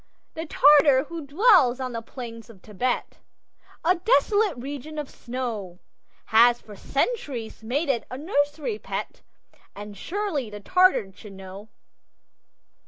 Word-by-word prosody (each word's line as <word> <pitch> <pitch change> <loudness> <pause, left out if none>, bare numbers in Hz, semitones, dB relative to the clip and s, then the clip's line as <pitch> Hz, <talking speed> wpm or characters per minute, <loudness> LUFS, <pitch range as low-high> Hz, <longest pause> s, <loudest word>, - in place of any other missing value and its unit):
The 320 0 -6
Tartar 285 -3 +6
who 330 -4 -7
dwells 305 - +4
on 255 -1 -3
the 230 -1 -4
plains 230 -1 -9
of 195 -5 -16
Thibet 240 +4 -3 0.7
(A 360 +2 +4
desolate 410 - +2
region 285 +4 -7
of 295 -2 -5
snow) 235 -8 -5 0.5
Has 235 +2 +5
for 210 - -13
centuries 275 - -3
made 280 +8 -1
it 265 -4 0
a 255 - -6
nursery 300 - -1
pet, - - -6 0.5
And 205 0 -9
surely 330 - -3
the 210 0 -8
Tartar 360 - +3
should 205 +1 -13
know! 195 +2 -11
260 Hz, 130 wpm, -25 LUFS, 225-315 Hz, 0.7 s, Tartar